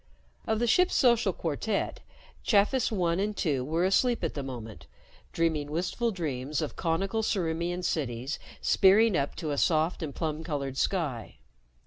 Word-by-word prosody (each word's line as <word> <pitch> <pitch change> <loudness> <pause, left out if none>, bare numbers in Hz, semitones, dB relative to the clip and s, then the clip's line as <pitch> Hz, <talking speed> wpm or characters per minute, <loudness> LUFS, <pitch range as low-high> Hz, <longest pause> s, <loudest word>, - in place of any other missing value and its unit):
Of 220 - +1
the 240 - +1
ship's 360 +11 +3
social 235 -6 +4
quartet, 180 +6 -2 0.4
Chafis 220 +4 +2
One 175 -4 0
and 210 +1 -1
Two 140 -7 0
were 165 +6 0
asleep 235 +4 +2
at 165 - -1
the 145 - -4
moment, 120 -5 -8 0.4
dreaming 160 -3 0
wistful 180 +9 -1
dreams 150 - -3
of 155 - -3
conical 190 +6 -1
Ciriimian 175 -3 -1
cities 135 -5 -2 0.2
spearing 205 +2 +5
up 140 -2 -1
to 155 -4 -4
a 140 - 0
soft 160 +2 +1
and 150 -4 -5
plum 160 -1 -3
colored 140 -4 -3
sky. 140 - -2
165 Hz, 150 wpm, -28 LUFS, 145-200 Hz, 0.4 s, spearing